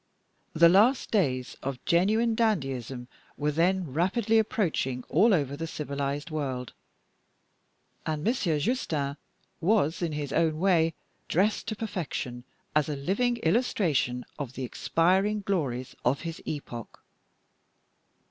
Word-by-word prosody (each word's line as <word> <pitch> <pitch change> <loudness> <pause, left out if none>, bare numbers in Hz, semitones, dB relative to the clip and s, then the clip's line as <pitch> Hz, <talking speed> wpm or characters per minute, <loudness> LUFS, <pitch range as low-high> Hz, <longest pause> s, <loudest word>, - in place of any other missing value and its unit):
The 170 +1 +7
last 215 +9 +4
days 130 - +1
of 135 -2 -5
genuine 215 +7 +3
dandyism 135 - -1 0.3
were 150 +1 0
then 170 -1 +1
rapidly 220 - +2
approaching 170 - 0
all 225 +2 +5
over 140 -7 +1
the 165 +3 -4
civilized 145 0 -3
world; 130 -5 -3 1.3
and 155 -1 -2
Monsieur 195 -9 +1
Justin 145 - -1 0.4
was, 180 -3 +2
in 165 -3 -1
his 145 -2 -3
own 160 -2 +2
way, 165 -3 +3 0.3
dressed 200 +7 +1
to 220 - -2
perfection, 155 - -4 0.3
as 150 0 +3
a 150 - -1
living 205 - 0
illustration 160 - +1
of 135 -4 -4
the 130 - -5
expiring 190 - +1
glories 140 -11 -2
of 130 +3 +1
his 165 -1 -6
epoch. 120 -6 -6
160 Hz, 120 wpm, -28 LUFS, 140-200 Hz, 1.3 s, The